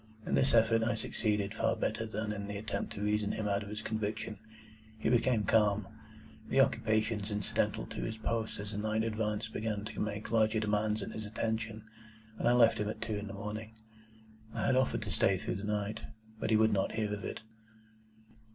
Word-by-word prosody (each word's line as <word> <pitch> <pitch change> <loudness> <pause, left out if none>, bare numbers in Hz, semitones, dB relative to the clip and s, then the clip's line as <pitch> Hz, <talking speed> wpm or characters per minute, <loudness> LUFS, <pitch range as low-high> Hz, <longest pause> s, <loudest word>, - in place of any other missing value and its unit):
In - - -2
this 130 -3 +4
effort 115 0 +5
I 115 +2 +1
succeeded 105 -2 -1
far 115 +1 +1
better 110 +1 -1
than 110 0 -2
in 100 -1 -5
the 100 0 -4
attempt 110 +2 -3
to 100 - -4
reason 105 0 +1
him 110 -1 -2
out 100 0 +1
of 100 - -7
his 105 0 -5
conviction. 110 -1 -3 0.6
He - - 0
became 120 -2 +3
calm; 105 -1 +3 0.6
the - - +3
occupations 110 -1 +2
incidental 105 -2 0
to - - -6
his 110 0 -3
post 110 -1 -2
as 100 +1 -4
the 105 - -3
night 110 +1 +1
advanced 110 0 -1
began 105 -2 -2
to 110 - -6
make 105 0 -3
larger 110 -1 +3
demands 105 0 +1
on - - -5
his 110 -1 -5
attention: 110 0 -2 0.6
and - - +1
I - - +5
left 115 -2 +5
him 105 0 0
at - - -5
two 115 -1 -2
in 105 - -6
the 100 - -6
morning. 110 +2 -6 0.8
I - - 0
had 130 - +3
offered 120 -3 +2
to 100 - -4
stay 95 +3 +4
through - - -3
the 100 - -7
night, 105 0 -1 0.4
but - - -1
he 110 - +5
would 110 0 +4
not 95 -1 +1
hear 105 -2 -1
of 105 - -4
it. - - -4
110 Hz, 205 wpm, -33 LUFS, 105-110 Hz, 0.8 s, effort